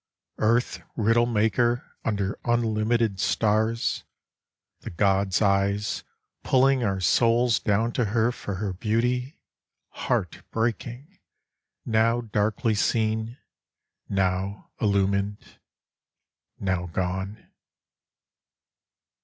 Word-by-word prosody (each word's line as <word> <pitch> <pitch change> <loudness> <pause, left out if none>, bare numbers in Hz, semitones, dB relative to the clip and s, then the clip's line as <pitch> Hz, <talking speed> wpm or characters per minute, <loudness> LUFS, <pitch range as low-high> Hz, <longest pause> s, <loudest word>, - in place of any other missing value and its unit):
Earth 115 +3 +1
riddle 115 +1 +3
maker 120 +2 +1
under 100 -2 -2
unlimited 115 -2 +1
Stars, 110 +3 +1 0.8
the - - -7
god's 95 +2 +1
eyes, 100 +1 +1 0.4
pulling 130 0 +3
our 95 -3 0
souls 115 +5 +3
down 105 +4 +1
to 120 - 0
her 115 +3 +1
For 100 -5 -5
her 95 0 -3
beauty, 125 - -1 0.5
heart - - -2
breaking, 120 - -3 0.7
now 115 +1 +2
darkly 110 0 0
seen. 110 +2 0 0.7
Now 95 +1 -1
illumin'd, 100 0 0 1.0
now 95 -2 -1
gone. 95 +4 -4
110 Hz, 85 wpm, -25 LUFS, 100-120 Hz, 1.0 s, riddle